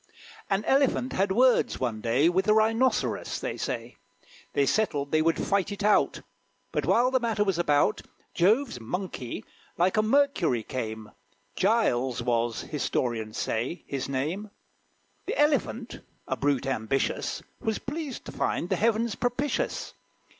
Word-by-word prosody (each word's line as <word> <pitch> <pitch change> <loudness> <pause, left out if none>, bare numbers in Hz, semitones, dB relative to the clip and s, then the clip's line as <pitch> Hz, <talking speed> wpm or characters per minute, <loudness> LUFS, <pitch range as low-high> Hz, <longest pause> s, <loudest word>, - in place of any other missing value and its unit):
An 195 +2 0
Elephant 270 -1 +2
had 195 +1 +1
words, 250 +5 +3
one 115 -4 -2
day, 120 +8 +3
With 185 +3 +1
a 215 - +5
Rhinoceros, 225 +4 +1
they - - -3
say. - - -4 0.6
They 140 - +3
settled 145 -6 0
they 155 - +3
would 165 +1 +2
fight 200 0 0
it 200 0 -5
out. 210 0 +3 0.5
But, - - -1
while 245 +2 +4
the 260 - +3
matter 225 -3 +1
was 195 -4 0
about, 145 -4 +2 0.3
Jove's 215 - +2
Monkey, 130 - -5 0.3
like 185 +5 +2
a - - +6
Mercury, 215 - +2
came: 110 -4 -5 0.4
Giles 130 - +1
was, 120 -1 0
historians 120 -7 -2
say, 120 +10 -2
his 140 -1 -4
name. 155 +11 -2 0.8
The - - -2
Elephant, 280 -5 +1 0.3
a 130 - -1
brute 140 -1 0
ambitious, 135 0 -1 0.2
Was 220 -1 -1
pleased 290 -2 -5
to - - -7
find 175 - -1
the - - +1
heaven 230 +1 +2
propitious. 245 +6 -2
185 Hz, 140 wpm, -27 LUFS, -, 0.8 s, a